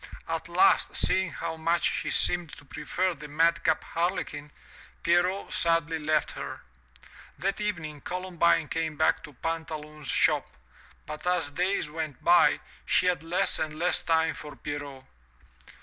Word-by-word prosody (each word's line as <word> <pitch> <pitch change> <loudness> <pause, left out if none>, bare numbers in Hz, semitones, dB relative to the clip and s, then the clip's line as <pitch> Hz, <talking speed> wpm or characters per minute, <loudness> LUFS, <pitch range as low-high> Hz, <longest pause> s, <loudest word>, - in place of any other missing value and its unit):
At - - -3
last, 390 0 +4
seeing 190 -1 +3
how 160 +3 -5
much 165 +2 +1
she - - 0
seemed 175 -2 +2
to 145 - -15
prefer 175 +6 -2
the 150 -2 -10
madcap 165 +3 +2
Harlequin, 165 -4 -2 0.5
Pierrot 180 +3 +1
sadly 165 -1 +1
left 155 0 +1
her. - - -7 0.8
That 195 +2 -2
evening 160 -8 -3
Columbine 175 -3 +1
came 160 -2 -2
back 160 - +2
to 150 - -14
Pantaloon's 155 -1 -5
shop, - - +2 0.6
but 150 +3 -7
as 175 -5 +1
days 180 +5 0
went 155 -2 -5
by, 345 +1 +5 0.2
she - - +3
had 180 -4 +2
less 165 +2 +1
and 155 -1 -3
less 175 +2 +1
time 160 -2 +2
for 150 -1 -9
Pierrot. 145 -2 -6
165 Hz, 140 wpm, -28 LUFS, 150-175 Hz, 0.8 s, by